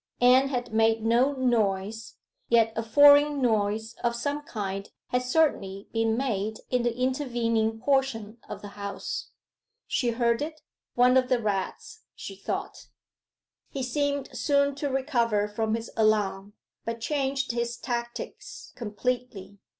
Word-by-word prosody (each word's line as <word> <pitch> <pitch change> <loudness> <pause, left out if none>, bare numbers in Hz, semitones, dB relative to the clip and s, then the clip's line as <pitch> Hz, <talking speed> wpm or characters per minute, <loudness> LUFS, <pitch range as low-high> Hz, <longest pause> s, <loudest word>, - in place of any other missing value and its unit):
Anne 255 +2 +6
had 245 -4 -3
made 225 0 +3
no 245 +5 +3
noise, 220 -4 0 0.3
yet 225 -1 +4
a 225 - 0
foreign 285 +5 +6
noise 220 -2 0
of 235 0 +1
some 285 +5 -2
kind 195 -7 -5 0.2
had 250 - +1
certainly 250 -8 0
been 225 0 +1
made 220 -5 -1
in 250 -1 +2
the 240 0 -1
intervening 235 -4 0
portion 245 -4 0
of - - -7
the 205 - -7
house. 200 0 -5 0.6
She 245 - 0
heard 235 +1 +1
it. 310 +1 -5 0.3
'One 250 +1 +5
of 255 -1 +2
the 250 - +3
rats,' 210 - -3
she - - -8
thought. - - -5 0.8
He 270 - -4
seemed 285 +2 -1
soon 280 0 +2
to 285 -1 -2
recover 235 -6 +1
from 220 +1 -1
his 230 0 -6
alarm, 205 -2 +1 0.3
but 230 0 -4
changed 270 +1 -1
his 235 0 -2
tactics 240 -1 -6
completely. 225 -3 -4
235 Hz, 135 wpm, -27 LUFS, 220-265 Hz, 0.8 s, Anne